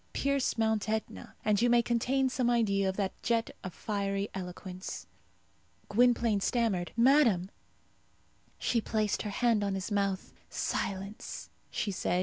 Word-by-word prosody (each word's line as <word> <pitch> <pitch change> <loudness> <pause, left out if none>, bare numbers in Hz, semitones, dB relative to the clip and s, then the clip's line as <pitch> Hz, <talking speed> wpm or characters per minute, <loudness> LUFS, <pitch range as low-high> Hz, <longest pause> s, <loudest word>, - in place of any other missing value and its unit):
Pierce 280 -3 +1
Mount 220 -2 +1
Etna, 220 0 -3
and 210 0 +3
you 240 - +4
may 240 0 +5
obtain 260 +3 +2
some 250 -1 +1
idea 200 -5 +2
of 190 - -4
that 195 -2 0
jet 230 -1 0
of 185 - -4
fiery 200 0 -2
eloquence. 185 0 -6 0.8
Gwynplaine 235 -1 +3
stammered, 200 -5 0
"Madame 235 -8 +4 0.6
" - - -36
She 235 - +3
placed 215 -2 0
her 210 - -3
hand 225 0 +2
on 200 -1 0
his 190 +2 -4
mouth. 200 -2 -1 0.2
"Silence," 200 +2 -3 0.2
she 205 - -2
said. 180 -1 0
210 Hz, 140 wpm, -31 LUFS, 195-235 Hz, 0.8 s, may